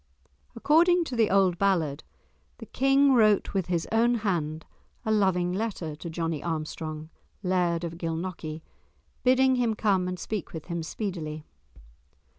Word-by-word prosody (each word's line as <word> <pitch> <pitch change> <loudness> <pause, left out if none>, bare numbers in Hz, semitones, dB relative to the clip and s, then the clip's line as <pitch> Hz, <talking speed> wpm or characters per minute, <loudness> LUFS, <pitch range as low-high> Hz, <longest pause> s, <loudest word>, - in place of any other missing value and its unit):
According 345 +4 +4
to 265 -6 -5
the 225 -3 +3
old 190 -3 +3
ballad 165 -7 +1 0.5
the - - -9
King 270 +1 +3
wrote 215 -4 +3
with 190 -3 -1
his 170 -2 -1
own 235 +2 +3
hand 165 -8 -2 0.4
a 220 - 0
loving 185 -4 +2
letter 185 -7 -3
to 170 - -7
Johnie 165 -2 -3
Armstrong, 155 -1 -4 0.3
Laird 175 -2 +1
of 170 0 -5
Gilnockie, 165 -2 -4 0.6
bidding 260 0 +4
him 235 -3 +1
come 195 -4 +1
and 180 0 -3
speak 210 0 -5
with 160 -2 -7
him 170 -1 -3
speedily. 160 -4 -5
180 Hz, 140 wpm, -27 LUFS, 165-220 Hz, 0.6 s, According